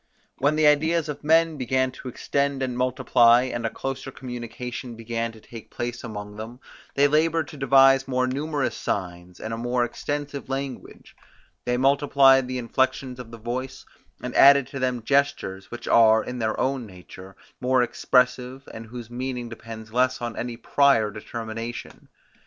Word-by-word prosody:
When 145 +3 +2
the 155 0 +3
ideas 155 +2 +3
of 150 0 -6
men 160 +1 +3
began 130 0 0
to 130 - -10
extend 140 +2 -1
and 125 -2 -2
multiply, 125 -1 +4
and 120 -2 -3
a - - -2
closer 135 +3 -5
communication 125 -1 -7
began 115 0 -3
to 110 - -15
take 115 0 -12
place 120 0 -5
among 105 -3 -7
them, 115 +3 -8 0.4
they 140 +1 +5
laboured 155 0 +1
to 150 - -10
devise 135 0 +5
more 130 -1 +1
numerous 140 -2 -2
signs, 90 -2 -4
and 110 - -5
a - - -3
more 120 +1 0
extensive 145 +2 -5
language: 135 -1 -6 0.5
they 125 0 0
multiplied 135 -1 +4
the 130 0 -3
inflections 130 +1 -1
of 125 -2 -9
the 115 - -10
voice, 130 +3 -5 0.4
and - - -4
added 140 -1 +7
to 135 - -6
them 125 -2 -1
gestures, 125 -8 0
which 120 - -8
are, 110 -1 +5
in 125 0 -6
their 110 -1 -1
own 130 -3 -1
nature, 95 0 -13 0.2
more 130 0 +2
expressive, 125 +2 0
and 115 0 -8
whose 120 0 -9
meaning 125 -1 -4
depends 110 -1 -10
less 130 +1 +2
on 120 -2 -4
any 120 -1 -4
prior 120 -4 +3
determination. 115 +2 -7
125 Hz, 165 wpm, -24 LUFS, 115-135 Hz, 0.5 s, added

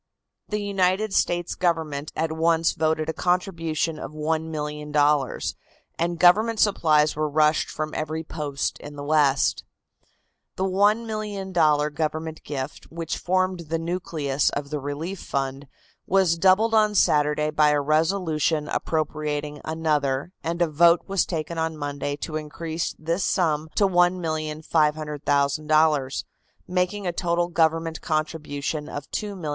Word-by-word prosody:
The 210 - -1
United 195 +1 +1
States 175 -2 +1
Government 160 -5 -1
at 160 0 -1
once 165 +1 +2
voted 155 0 0
a 160 - -1
contribution 165 -4 -1
of - - -6
$1,000,000, 150 -2 0 0.4
and 170 +1 0
government 215 +6 +4
supplies 155 -7 +3
were 155 0 -1
rushed 155 +1 +2
from 155 0 -4
every 155 +1 -3
post 150 -3 -3
in 145 0 -9
the 145 - -6
West. 145 -2 +2 0.9
The 190 - -2
$1,000,000 195 -6 +1
government 160 +1 -3
gift, 135 -3 -5
which 165 0 -5
formed 185 -2 0
the 165 - 0
nucleus 160 -5 -1
of 140 0 -5
the 150 - -2
relief 150 +7 -5
fund, 135 0 -3 0.4
was 190 -3 +3
doubled 195 +5 +4
on 215 -1 +3
Saturday 150 -2 +3
by 150 0 +4
a 150 0 +3
resolution 155 0 +1
appropriating 150 -2 -2
another, 150 -2 -1
and 170 +1 0
a - - +1
vote 170 +3 +5
was 195 -2 +1
taken 165 -1 -3
on 160 -1 -2
Monday 145 -1 -3
to 155 +2 -4
increase 160 +2 -4
this 165 +4 -1
sum 160 -4 +1
to 200 - +4
$1,500,000, 155 -4 +1 0.4
making 180 +2 -1
a 175 - -1
total 175 0 0
government 165 -1 +1
contribution 155 -1 -3
of 145 - -5
$2,500,000. 195 -7 -4
160 Hz, 130 wpm, -24 LUFS, 150-175 Hz, 0.9 s, vote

